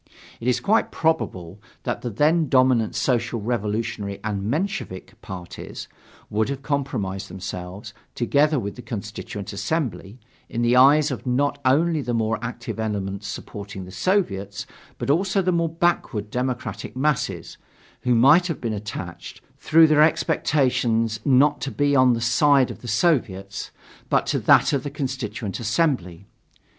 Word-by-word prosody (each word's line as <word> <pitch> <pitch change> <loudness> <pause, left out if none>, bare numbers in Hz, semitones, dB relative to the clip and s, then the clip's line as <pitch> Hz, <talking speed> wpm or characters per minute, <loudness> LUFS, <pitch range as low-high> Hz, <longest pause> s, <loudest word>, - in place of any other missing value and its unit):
It 115 - -5
is 125 - +2
quite 220 +3 +2
probable 100 - -1 0.2
that - - -3
the 120 - -3
then 150 +7 +2
dominant 130 -4 +3
Social 120 -2 0
Revolutionary 105 -2 -2
and 105 -2 -2
Menshevik 150 - -3
parties 90 -2 -8 0.4
would 110 +3 0
have 140 0 -4
compromised 110 -10 -2
themselves, 95 +3 -7 0.2
together 145 +5 +2
with 100 -3 -5
the 125 - -9
Constituent 105 -3 -6
Assembly, 115 -1 -3 0.3
in 120 - -2
the 120 +1 +3
eyes 145 +4 +6
of 130 - -6
not 145 +3 0
only 155 +4 +3
the 120 -3 -2
more 115 0 0
active 120 -2 -5
elements 100 -2 -3
supporting 100 -1 -7
the 90 - -11
Soviets, 100 - -1 0.3
but - - 0
also 190 +6 +1
of 195 - +2
the 185 - +3
more 170 -1 +1
backward 155 -11 -1
democratic 125 -1 -3
masses, 145 0 -1 0.4
who 125 -1 +2
might 145 +10 +6
have 165 - -3
been 115 -2 -2
attached, 100 -4 -7 0.2
through 160 +1 +6
their 155 -1 +4
expectations 120 -8 +2
not 140 +2 +4
to 135 - -2
the 130 -4 +3
side 135 +3 +4
of - - -10
the 120 - -9
Soviets, 105 - 0 0.4
but - - +2
to - - 0
that - - +5
of 140 - +1
the 145 - -5
Constituent 130 -7 -4
Assembly. 110 - -1
120 Hz, 145 wpm, -23 LUFS, 105-145 Hz, 0.4 s, eyes